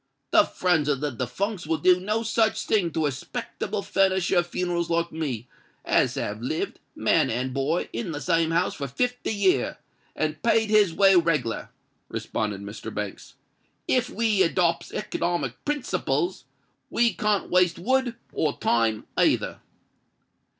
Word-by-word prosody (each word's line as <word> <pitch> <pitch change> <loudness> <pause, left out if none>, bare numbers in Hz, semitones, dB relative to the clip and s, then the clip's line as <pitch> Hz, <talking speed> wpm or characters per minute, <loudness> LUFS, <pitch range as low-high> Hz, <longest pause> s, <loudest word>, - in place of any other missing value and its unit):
"The 325 -3 +6
friends 160 -5 +1
of 140 -3 +1
the 150 0 -2
defuncts 160 - -3
will 160 0 +1
do 180 +1 +4
no 215 +4 -1
such 225 -1 +1
a - - -11
thing 190 -6 +2
to 160 - 0
a 145 - +1
'spectable 195 +8 -5
furnisher 190 -2 +2
of 175 - -1
funerals 175 -1 -1
like 170 0 0
me, 135 -8 -4 0.4
as - - +2
has 105 +1 -3
lived, 145 +6 -3 0.2
man - - +2
and 125 +3 -2
boy, 140 +6 0
in 195 -8 -3
the 145 - -4
same 165 0 +1
house 170 +2 +1
for 140 - -4
fifty 245 - -1
year, 190 - +1 0.4
and 155 0 -2
paid 225 -2 +2
his 210 -4 +5
way 195 +3 +5
reglar," 150 -10 +1 0.4
responded 105 -2 -3
Mr. 105 +2 -7
Banks. 105 -2 -6 0.5
"If 255 - +2
we 220 -2 +1
adopts 170 -1 +1
economic 170 - -2
principles, 295 +4 -1 0.4
we 235 -1 +2
can't 210 -2 0
waste 180 -2 +3
wood 255 +4 +1 0.2
or 150 -2 0
time 115 -2 +1
either." - - +2
175 Hz, 150 wpm, -25 LUFS, 145-205 Hz, 0.5 s, The